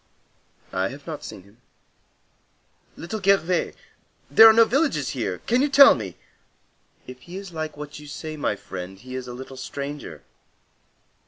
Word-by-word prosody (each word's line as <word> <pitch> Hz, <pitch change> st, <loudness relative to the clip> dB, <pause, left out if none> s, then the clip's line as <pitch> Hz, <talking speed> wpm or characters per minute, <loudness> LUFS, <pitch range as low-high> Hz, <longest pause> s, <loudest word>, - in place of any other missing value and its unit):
"I 95 Hz, 0 st, 0 dB
have 140 Hz, +6 st, -10 dB
not 160 Hz, -3 st, -7 dB
seen 95 Hz, -, -9 dB
him." 100 Hz, +5 st, -23 dB, 1.4 s
"Little 200 Hz, +6 st, -5 dB
Gervais? 185 Hz, -2 st, +2 dB, 0.6 s
There 225 Hz, -, +10 dB
are -, -, +10 dB
no 230 Hz, +1 st, +6 dB
villages 255 Hz, -, 0 dB
here? 110 Hz, -8 st, -3 dB
Can 245 Hz, +2 st, +2 dB
you 290 Hz, -, +2 dB
tell 280 Hz, 0 st, +9 dB
me?" 95 Hz, -6 st, -6 dB, 0.9 s
"If 130 Hz, 0 st, -11 dB
he 175 Hz, +6 st, -9 dB
is 195 Hz, -3 st, -9 dB
like 155 Hz, -2 st, -5 dB
what 150 Hz, 0 st, -8 dB
you 150 Hz, -, -12 dB
say, 155 Hz, +2 st, -7 dB
my 145 Hz, -8 st, -1 dB
friend, 95 Hz, -1 st, -8 dB
he 130 Hz, +5 st, -11 dB
is 130 Hz, -1 st, -5 dB
a 120 Hz, -, -7 dB
little 130 Hz, +1 st, -9 dB
stranger. 140 Hz, -, -7 dB
145 Hz, 160 wpm, -24 LUFS, 120-185 Hz, 1.4 s, There